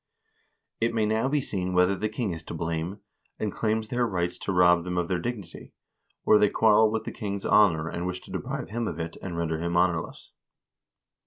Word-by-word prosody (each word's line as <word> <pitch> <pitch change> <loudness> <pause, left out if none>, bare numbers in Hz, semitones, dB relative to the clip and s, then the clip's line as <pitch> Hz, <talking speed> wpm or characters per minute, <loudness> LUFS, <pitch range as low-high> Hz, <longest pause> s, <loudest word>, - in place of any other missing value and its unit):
" - - -48
It 115 0 +1
may 110 -1 +2
now 110 +4 +1
be 145 0 +1
seen 90 -7 -3
whether 90 +2 +4
the 105 +3 -2
king 110 -2 -2
is 80 - -6
to - - -6
blame, 85 +4 -3 0.4
and 105 -2 -2
claims 110 0 -1
their 120 -1 +1
rights 90 -4 -2
to - - -3
rob 90 -2 +5
them 90 0 -3
of 90 -1 0
their 90 -2 0
dignity, 100 -3 -6 0.5
or 105 - +6
they 105 -1 +4
quarrel 110 0 +4
with 110 0 -2
the - - -5
king's 100 -2 -5
honor, 85 -7 +4
and 85 +1 -3
wish 90 0 -3
to - - -13
deprive - - -4
him 115 0 -2
of 85 - -4
it 80 0 -4
and 85 -3 -5
render 80 -1 -1
him 85 0 -1
honorless. 85 -2 0
95 Hz, 215 wpm, -27 LUFS, 85-110 Hz, 0.5 s, or